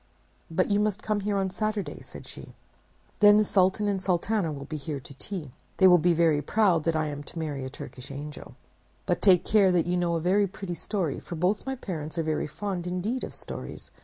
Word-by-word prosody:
"But 185 +4 +1
you 205 - +3
must 210 0 0
come 215 -1 0
here 205 0 -1
on 190 -1 0
Saturday," 215 0 -3
said - - -11
she. - - -9 0.6
"Then 205 0 +8
the 215 - +5
Sultan 195 +1 +2
and 195 -2 0
Sultana 185 -1 0
will 140 -2 -6
be 155 - -6
here 145 -1 -4
to 140 +1 -12
tea. 155 -1 -6 0.3
They 190 - +5
will 180 -1 +8
be 175 +2 +3
very 160 -3 +3
proud 180 -1 +2
that 165 -1 +1
I 155 0 +1
am 145 0 -5
to 145 - -11
marry 150 -4 -3
a 130 - -4
Turkish 130 -1 -9
angel. 145 +2 -8 0.5
But - - 0
take 185 -4 +5
care 200 -3 +5
that 175 -3 +2
you 180 +1 0
know 175 -1 +1
a - - +1
very 195 +5 +3
pretty 190 -1 -6
story, 170 -2 -2
for 175 - -7
both 185 +9 0
my 265 - -1
parents 165 - -5
are 165 - +1
very 155 -1 -1
fond 180 +2 -4
indeed 195 +8 -2
of - - -6
stories. - - -7
180 Hz, 220 wpm, -27 LUFS, 155-205 Hz, 0.6 s, Then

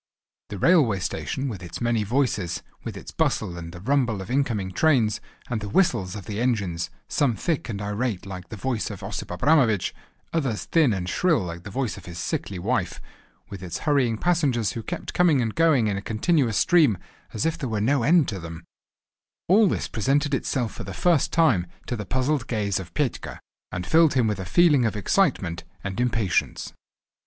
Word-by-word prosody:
The 100 - -5
railway 140 - +4
station 130 +8 -3
with 105 -8 -5
its 85 -1 -7
many 120 -2 +1
voices, 105 -7 -1 0.2
with - - -6
its - - -9
bustle 85 - 0
and 85 -1 -7
the 90 - -10
rumble 120 -1 +1
of 95 +5 -7
incoming 115 -8 0
trains, 115 - +2 0.3
and 115 -3 -2
the 105 - -5
whistles 110 - +1
of 100 -4 -7
the 105 +3 -4
engines, 95 -9 -1 0.2
some 135 -6 +1
thick 160 -3 -2
and 100 -3 -3
irate 105 0 -2
like 90 -2 -8
the - - -6
voice 120 +1 -2
of 100 -4 -8
Osip - - -5
Abramovich, 110 - +2 0.4
others 130 - -1
thin 160 -7 +3
and 95 -3 -2
shrill 160 - +2
like 85 -1 -6
the - - -6
voice 125 +2 -2
of - - -12
his 85 -1 -8
sickly 95 +2 -3
wife, 90 - -1 0.5
with 100 -2 -7
its 90 -3 -4
hurrying 130 -7 +2
passengers 140 - +1
who 115 - -5
kept - - -5
coming 170 -6 +4
and 115 -3 -1
going 160 -8 +3
in 105 -2 0
a - - -3
continuous 115 - +1
stream, 160 - +4 0.3
as 105 - -2
if 165 - +1
there 130 - -4
were 110 -2 -1
no 130 +6 +2
end 155 +4 +4
to 100 -4 -4
them—all 85 - -2
this - - -1
presented 140 +6 0
itself 120 -5 -1
for 115 - -7
the 95 -1 -7
first 170 - +2
time 125 - +3 0.2
to 120 - -3
the 105 -3 -6
puzzled 130 0 0
gaze 100 -4 -1
of 90 -2 -8
Petka, 145 -6 -2 0.3
and 90 0 -4
filled 160 -3 +4
him 125 -3 +3
with 105 -2 -1
a 95 - -4
feeling 150 - +4
of 110 -1 0
excitement 105 - +1 0.2
and 100 +1 -4
impatience. 115 -7 0
115 Hz, 190 wpm, -25 LUFS, 95-140 Hz, 0.5 s, railway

